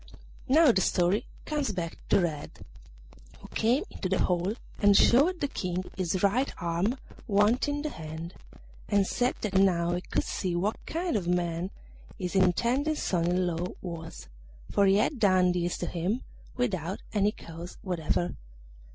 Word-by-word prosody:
Now 300 +1 +6
the 190 - +2
story 185 +6 +1 0.2
comes 295 -6 -1
back 170 -3 -3
to - - +5
Red, 160 -5 -3 0.7
who - - -13
came 245 +9 +2
into 185 - -4
the 190 - +2
hall 180 +4 +1 0.3
and 205 -1 +6
showed 320 +9 +5
the 285 - +1
King 185 -7 -3
his 185 0 -1
right 240 +8 +2
arm 175 +8 0 0.3
wanting 240 +8 +2
the 305 - -2
hand, 160 +2 -7 0.6
and 200 -2 +3
said 245 +5 0
that 210 -3 -2
now 175 -3 +3
he 175 - -1
could - - -1
see 180 -3 -2
what 200 +5 -1
kind 340 -3 -1
of 190 -5 -1
a - - 0
man 175 0 0 0.5
his 180 +1 -4
intended 240 - +2
son 170 - 0
in 180 +1 +2
law 175 0 -1
was, 165 -2 -7 0.4
for 200 - +4
he 195 - +5
had 230 +6 +1
done 185 -3 +4
this 175 0 -1
to - - -3
him 185 +9 -2 0.3
without 190 -7 -2
any 205 -1 +3
cause 170 -3 -10
whatever. 155 - -1
190 Hz, 160 wpm, -28 LUFS, 175-225 Hz, 0.7 s, Now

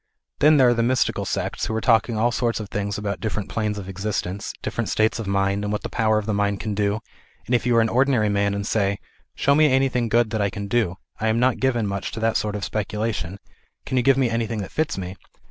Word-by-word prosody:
Then 150 +1 +6
there 130 -2 +6
are - - +4
the 115 - 0
mystical 125 +2 +1
sects, - - -2
who 110 - -2
are - - +1
talking 115 -1 +2
all 120 +3 +2
sorts 115 0 0
of 105 -2 -6
things 100 0 -2
about 105 -1 -3
different 105 -3 -3
planes 105 -2 -2
of 100 -2 -6
existence, 95 0 -3
different - - -2
states 110 +2 +1
of 110 - -4
mind, 100 +1 +1
and 105 - -2
what 105 - -2
the - - -4
power 110 -2 +2
of 105 - -2
the 110 - -1
mind 100 -1 0
can 105 -1 -3
do, 105 +1 0 0.4
and 125 - -2
if 125 0 +2
you 120 - +3
are 115 - +6
an 115 - +2
ordinary 125 -2 +2
man 100 0 +1
and 100 0 -3
say 100 -2 +1 0.2
" - - -40
Show 140 - +3
me 150 0 +5
anything 130 -3 +2
good 115 -1 +2
that 110 - -1
I 100 - +2
can 100 +1 -6
do; 100 -5 0 0.2
I 110 - 0
am 110 +1 +2
not 125 0 +2
given 120 -4 +1
much 100 -1 -3
to - - -4
that 115 0 +1
sort 105 -1 0
of 100 - -3
speculation; 105 -3 -3 0.5
can - - -3
you 125 - +4
give 135 +1 +4
me 135 -2 +3
anything 115 -1 -1
that - - -9
fits 155 -5 -1
rfce 95 +1 -5
110 Hz, 260 wpm, -23 LUFS, 100-120 Hz, 0.5 s, Then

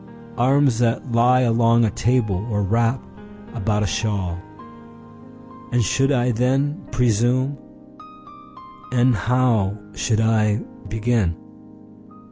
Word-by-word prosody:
Arms 130 -1 +2
that 120 +1 -1
lie 125 +2 +3
along 115 -1 +3
a 105 - 0
table, 105 -5 0
or 105 -2 -1
wrap 115 +5 +1 0.5
about 105 -2 -1
a - - 0
shawl. 95 -2 -2 1.3
And 120 -1 +2
should 135 +8 +1
I 125 -2 +1
then 135 +6 0
presume? 125 +3 +1 1.4
And 125 0 +3
how 115 -2 +1 0.2
should 110 +1 -1
I 110 -1 +1 0.3
begin? 110 -6 0
115 Hz, 100 wpm, -21 LUFS, 105-125 Hz, 1.4 s, lie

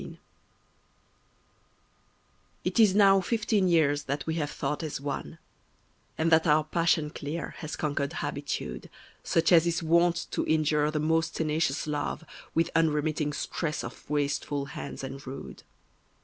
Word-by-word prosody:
XIV - - -9 2.5
It - - -1
is 210 -4 +6
now 195 -2 +6
fifteen 215 -1 +1
years 150 -4 +3
that 140 +1 -3
we 160 - -1
have 155 -3 -1
thought 145 0 -3
as 155 -4 -4
one; 140 -1 -5 0.8
And 160 +1 +1
that 160 +1 +5
our 150 0 +4
passion 155 -1 +1
clear 155 +4 -5
has 155 -1 -5
conquered 145 -2 -2
habitude, 60 0 -4 0.3
Such 165 +2 +2
as 170 -1 +6
is 170 0 0
wont 170 +1 +3
to - - 0
injure 150 -1 +2
the 155 0 -1
most 160 +2 +1
tenacious 155 -2 0
love 150 +2 -3 0.3
With 165 0 +2
unremitting 155 -1 +1
stress 155 +1 -3
of - - -9
wasteful 145 -1 -1
hands - - -6
and 135 +1 -6
rude. 135 - -8
155 Hz, 140 wpm, -28 LUFS, 145-165 Hz, 2.5 s, is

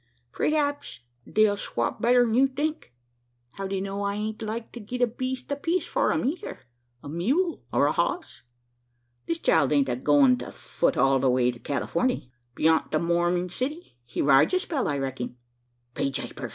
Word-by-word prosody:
Preehaps 290 - -1 0.3
they'll 215 -1 +3
swop 120 -11 -3
better'n 245 -1 +4
you 265 +3 +5
think. 290 - -3 0.6
How 195 +6 -5
d'ye 195 0 -2
know 195 +1 -4
I 200 0 -1
ain't 215 +1 -4
like 225 +1 -4
to 240 - -8
git 245 +3 -6
a - - +7
beest 255 +3 -5
apiece 330 +6 0
for - - +1
'em - - 0
eyther 315 - -4 0.4
a - - -8
mule 260 - 0
or - - +3
a - - +3
hoss? 355 -2 -2 0.9
This 165 - 0
child 160 -4 +2
ain't 140 -3 +3
a 125 - 0
going 135 -1 +4
to - - -7
fut - - -1
it - - -7
all 135 +1 +4
the 130 0 +2
way 125 0 +3
to 120 - -12
Californey. 165 - -1 0.2
B'yont 160 +3 +2
the 155 - +1
Morming 175 +2 +1
City, 290 - -4
he 120 - -3
rides 140 - +5
a - - +3
spell, 310 -8 -2
I 145 - 0
recking." 130 -2 -4 0.6
"Be 140 - -1
japers! 135 - -5
200 Hz, 180 wpm, -26 LUFS, -, 0.9 s, a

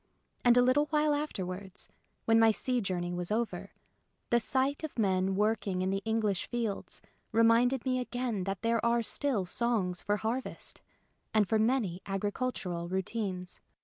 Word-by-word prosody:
And 245 0 +6
a 245 - +7
little 275 +4 +3
while 300 -1 +2
afterwards, 195 -9 -4 0.4
when 225 0 +5
my 225 0 +6
sea 250 +3 0
journey 175 -3 -2
was 175 0 -3
over, 230 +1 -2 0.6
the 240 - +5
sight 265 +6 0
of 315 - -5
men 190 -3 +1
working 205 -3 0
in 190 - 0
the 195 0 -1
English 220 -4 0
fields 230 -4 -3 0.3
reminded 230 +3 +4
me 255 -1 +1
again 245 -6 -2
that 195 +1 -4
there 230 -1 +1
are 235 0 +2
still 240 -5 0
songs 195 -3 0
for 205 0 0
harvest 230 +5 -4 0.5
and 210 -2 +4
for 220 +2 +2
many 215 -6 +1
agricultural 195 -3 -2
routines. 190 -1 -3
220 Hz, 150 wpm, -31 LUFS, 190-245 Hz, 0.6 s, a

